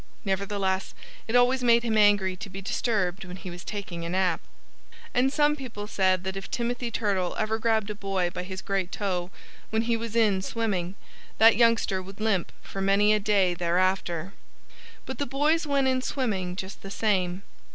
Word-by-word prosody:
Nevertheless 195 -1 -1 0.3
it 225 - -1
always 250 +1 +4
made 235 -1 +5
him 225 -2 0
angry 205 -3 +4
to 200 +2 -8
be 195 - -7
disturbed 195 -2 -1
when 180 -1 -8
he 185 - -8
was 175 0 -9
taking 190 -5 -5
a 170 - -4
nap. 185 -1 +1 0.7
And 255 +2 +3
some 295 0 +3
people 240 -7 -7
said 185 -3 +1
that 190 0 -3
if 195 0 -6
Timothy 240 0 -2
Turtle 200 -6 -1
ever 220 +1 0
grabbed 220 -2 +1
a - - -3
boy 195 -3 -1
by 180 - -4
his 190 +1 -6
great 195 -2 -1
toe, 180 -3 -2 0.4
when 220 +1 +1
he 235 0 +1
was 230 0 -5
in 210 -5 +3
swimming, 195 -4 -2 0.4
that 225 +1 +7
youngster 230 -5 +3
would 195 +2 -11
limp 215 -5 0
for 195 - -6
many 200 +2 +4
a 215 - +2
day 195 -3 +2
thereafter. 175 0 0 0.7
But 265 - -6
the 285 - -1
boys 300 +4 +1
went 280 -2 +2
in 260 0 +2
swimming 200 -10 -2
just 190 +1 -7
the 195 - -8
same. 190 -3 0
200 Hz, 185 wpm, -27 LUFS, 185-230 Hz, 0.7 s, that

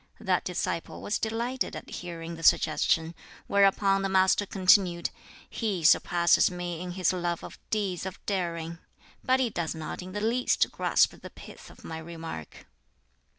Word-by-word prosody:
That 190 -5 0
disciple 170 -2 -3
was 205 - -2
delighted 235 +4 -2
at - - -8
hearing 170 -1 -7
the 165 - -10
suggestion; 160 +1 +3 0.3
whereupon 195 0 +3
the 195 - -1
Master 190 +1 +3
continued, 185 -2 +3 0.4
"He 205 -7 -3
surpasses 170 +2 +4
me 175 -2 -5
in 180 -1 -5
his 185 -1 +1
love 175 -2 -2
of - - -10
deeds 195 -4 -1
of 190 - -7
daring. 170 -4 -3 0.4
But 260 0 +3
he 250 -3 +1
does 170 -3 -3
not 160 +2 -6
in 185 +1 -9
the 205 - -2
least 235 +3 +1
grasp - - +2
the - - -9
pith - - -13
of - - -16
my 160 0 -6
remark." 160 - -8
180 Hz, 155 wpm, -28 LUFS, 170-200 Hz, 0.4 s, surpasses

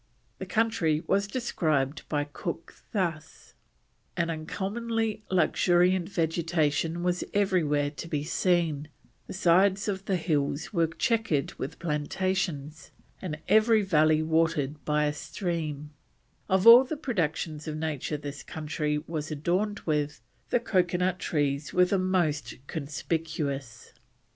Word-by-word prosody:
The 190 - -6
country 180 -7 +1
was 200 +1 +1
described 155 - -1
by 145 -1 0
Cook 165 +3 -6 0.2
thus: 165 -7 -3 0.6
"an 170 -1 +1
uncommonly 215 +7 -2
luxuriant 180 0 +3
vegetation 165 -1 0
was 180 0 0
everywhere 155 -8 +2
to 160 - -8
be 150 -3 -2
seen; 165 -3 +1 0.4
the - - -7
sides 190 +2 +3
of 195 -1 -3
the 195 - +1
hills 150 -1 -1
were 170 -3 +3
chequered 165 - 0
with 140 +4 -5
plantations; 155 -2 -2 0.3
and 160 -5 -4
every 220 0 +5
valley 155 -4 +3
watered 155 -3 0
by 150 0 +2
a 150 - 0
stream; 150 -3 -4 0.6
of 190 +1 +2
all 235 +3 +11
the 295 +4 -4
productions 160 - -2
of 155 -1 -3
nature 155 -1 -2
this 145 0 -7
country 150 -1 -2
was 155 -2 -4
adorned 180 +8 -1
with, 150 -4 -1 0.3
the 245 - +3
coconut 180 -4 +1
trees 145 -4 -1
were 180 0 +5
the 190 +1 +1
most 175 -6 0
conspicuous." 145 -4 -4
165 Hz, 125 wpm, -28 LUFS, 150-190 Hz, 0.6 s, all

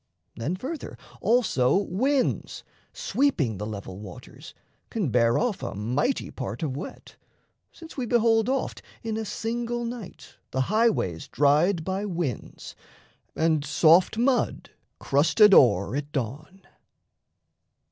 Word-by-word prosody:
Then, 145 +10 -2
further, 275 - -6 0.2
also 220 - +2
winds, 250 +8 -1 0.3
Sweeping 150 - 0
the 105 - -4
level 100 -3 -7
waters, 100 -4 -11 0.3
can 195 - -2
bear 115 -1 +3
off 240 -5 -1
A - - -5
mighty 125 - -1
part 120 0 -5
of 135 -4 -2
wet, 145 - -9 0.5
since 325 -2 -13
we 250 -3 -2
behold 225 -1 +3
Oft 265 -1 -2 0.2
in 225 -1 -3
a 220 - -2
single 235 +2 -3
night 230 -5 -8
the 130 - -1
highways 210 - +1
dried 155 +5 +2
By 190 +3 -2
winds, 170 - -5 0.6
and 160 -2 +1
soft 165 +7 +4
mud 250 +2 0 0.3
crusted 180 +9 +4
o'er 120 - +5
at 145 +1 -4
dawn. 145 - -5
180 Hz, 120 wpm, -26 LUFS, -, 0.6 s, o'er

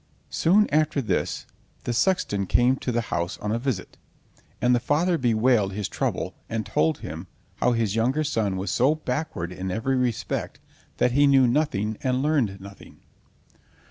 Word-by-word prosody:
Soon 205 +6 +3
after 155 -1 +2
this 125 - -1 0.4
the 120 - -2
sexton 115 - +1
came 125 +6 +3
to 125 - -3
the 120 0 0
house 85 +2 -2
on 105 - -3
a 115 - 0
visit, 120 -7 -4 0.6
and 125 0 +3
the 120 - +3
father 160 +8 +1
bewailed 115 -6 +2
his 105 0 -3
trouble, - - -2 0.2
and 115 -2 -2
told 80 -2 0
him 80 +4 -7 0.3
how 125 - +2
his 110 -3 0
younger 130 +7 +1
son 105 -9 -1
was 95 +2 -3
so 135 +5 +3
backward 125 - -3
in 95 +1 -5
every 115 +8 -1
respect 125 -3 -2 0.4
that 125 - +2
he 140 +3 +4
knew 135 -2 +5
nothing 120 -6 0
and 130 0 0
learned 130 -11 +1
nothing. 100 +1 -13
120 Hz, 165 wpm, -25 LUFS, 100-140 Hz, 0.6 s, knew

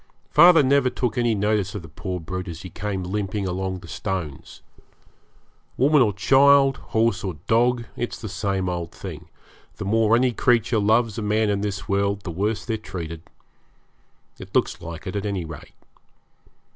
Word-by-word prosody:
Father 165 0 +7
never 135 -1 +3
took 125 -3 -2
any 120 -2 +1
notice 105 -1 0
of 100 - -5
the - - -10
poor 90 +4 -5
brute 90 +3 -5
as 85 -1 -7
he 90 - -9
came 95 +1 -4
limping 100 +1 -2
along 95 +1 -3
the - - -12
stones. 85 -4 -5 1.1
Woman 145 +2 +4
or 110 -4 +4
child, 135 +6 +5
horse 110 -4 0
or 95 -4 -3
dog, 120 +2 +2
it's 120 - -4
the 110 - -6
same 95 -1 -2
old 85 -2 -3
thing - - -8 0.5
the 105 - -6
more 110 +2 +3
any 125 +1 +3
creature 115 -2 +2
loves 110 +1 +2
a - - -3
man 105 0 +1
in 100 -1 -1
this 100 -2 -4
world 100 0 0
the 95 - -6
worse 105 +6 -2
they're 115 -2 -1
treated. 85 -6 -7 1.2
It - - -11
looks - - +1
like 85 +1 -8
it, 95 - -5
at 100 - -2
any 95 -4 -2
rate. 80 -2 -11
100 Hz, 170 wpm, -23 LUFS, 95-115 Hz, 1.2 s, Father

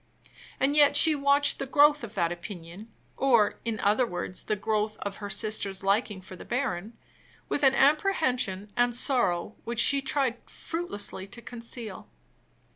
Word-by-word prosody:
And 275 +2 +2
yet 290 -1 +6
she 315 +2 +6
watched 280 0 +2
the 270 - -3
growth 290 0 +4
of 225 - -8
that 170 -3 0
opinion 175 +4 -9 0.3
or, 235 -6 +3
in 225 -2 -3
other 210 +5 +3
words, 180 -1 -5
the 215 - -2
growth 215 +1 -1
of 200 -1 -5
her 205 -1 -6
sister's 200 -2 -2
liking 200 0 0
for 185 0 -11
the - - -11
baron 230 -5 -3 0.5
with - - -1
an 270 -1 +4
apprehension 265 - +1
and 245 0 +2
sorrow 230 -8 +1
which 235 0 -4
she 280 +3 +4
tried 270 -3 0
fruitlessly 205 - -5
to 235 +4 -11
conceal. 230 -3 -7
230 Hz, 155 wpm, -27 LUFS, 200-275 Hz, 0.5 s, yet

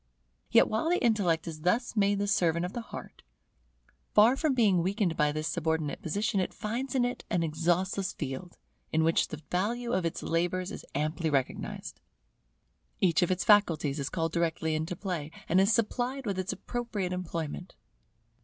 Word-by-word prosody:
Yet - - +6
while 220 +9 0
the 355 - +3
intellect 195 -9 +2
is 155 -2 -6
thus 230 +9 +1
made 200 -1 +3
the 200 - 0
servant 170 -4 +2
of 180 - -6
the 240 - -3
heart, 225 - -10 0.9
far 220 +5 +7
from 285 -1 +1
being 205 -8 +4
weakened 190 -1 0
by 150 -1 +2
this 155 +1 -2
subordinate 160 0 -1
position, 205 +4 0
it 185 - -2
finds 240 +5 -3
in 250 -2 +3
it 245 - -3
an 175 -1 +1
exhaustless 175 +4 0
field, 145 +4 -6 0.3
in 160 0 +2
which 165 +1 +3
the 155 0 -8
value 235 +6 -1
of 185 - +1
its 165 - -3
labours 175 +3 0
is - - -8
amply 155 +3 0
recognized. 135 -3 -2 1.0
Each 175 -4 +3
of 175 - +2
its 185 0 0
faculties 160 -9 +3
is 140 +1 -2
called 165 -2 -1
directly 165 -1 0
into 160 +3 -2
play, 175 -5 -4 0.2
and 180 +3 +4
is 195 +3 +4
supplied 245 +4 0
with 195 -3 -2
its 185 0 -1
appropriate 220 -7 -3
employment. 175 -1 -5
180 Hz, 175 wpm, -29 LUFS, 160-210 Hz, 1.0 s, far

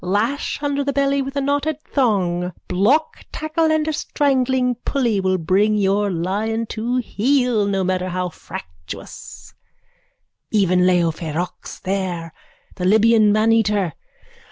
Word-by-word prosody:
Lash 215 +10 -1
under 285 0 0
the 280 0 -1
belly 280 0 +1
with 270 +1 -5
a 280 - 0
knotted 285 +2 0
thong. 180 -9 0
Block 220 - +1
tackle 315 +1 0
and 315 0 +1
a 315 - 0
strangling 260 -4 +1
pulley 240 -7 0
will 185 -1 +1
bring 195 +6 +2
your 200 0 +1
lion 205 +6 -1
to 230 +3 -2
heel, 245 -2 +1
no 195 -1 0
matter 185 0 -1
how 180 0 -2
fractious, 80 - -10 1.0
even 185 -3 +3
Leo 175 -2 +3
ferox 165 +2 -5
there, 185 -4 -3 0.4
the 180 - -4
Libyan 220 +1 +5
maneater. 210 -5 +2
210 Hz, 130 wpm, -20 LUFS, 185-265 Hz, 1.0 s, Libyan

